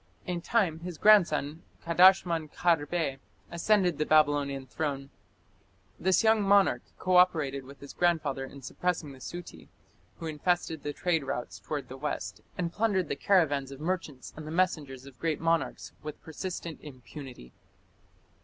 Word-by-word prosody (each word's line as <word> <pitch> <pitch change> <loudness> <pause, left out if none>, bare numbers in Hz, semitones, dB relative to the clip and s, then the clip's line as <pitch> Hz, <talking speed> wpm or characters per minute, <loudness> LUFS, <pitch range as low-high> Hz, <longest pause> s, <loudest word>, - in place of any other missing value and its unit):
In 175 -1 -3
time 180 -6 +1
his 175 -1 -7
grandson, 165 -7 +4 0.2
Kadashman 170 -2 +4
Kharbe, 160 -4 0 0.3
ascended 180 -1 +2
the 155 - +1
Babylonian 145 -3 +3
throne. 140 0 -4 0.9
This 190 +4 +3
young 220 -1 +4
monarch 195 -11 +4 0.2
co 185 0 +2
operated 145 -7 +3
with 140 +1 -13
his 140 - -10
grandfather 165 -6 +1
in 135 0 -10
suppressing 170 0 -2
the 135 - -13
Suti, 175 +6 -9 0.5
who 165 - -7
infested 160 0 -1
the 145 - -3
trade 165 0 0
routes 120 -8 -4
towards 145 +8 -5
the 130 - -9
west, 150 +2 -4 0.2
and 170 -2 -2
plundered 200 -6 +1
the - - -1
caravans 145 -6 +2
of 135 -1 -10
merchants 160 -5 -4
and 155 0 -8
the - - -5
messengers 155 -7 -1
of 135 -3 -14
great 160 -2 -1
monarchs 165 0 -1
with 150 -1 -7
persistent 170 0 -6
impunity. 130 - -11
160 Hz, 145 wpm, -29 LUFS, 140-180 Hz, 0.9 s, grandson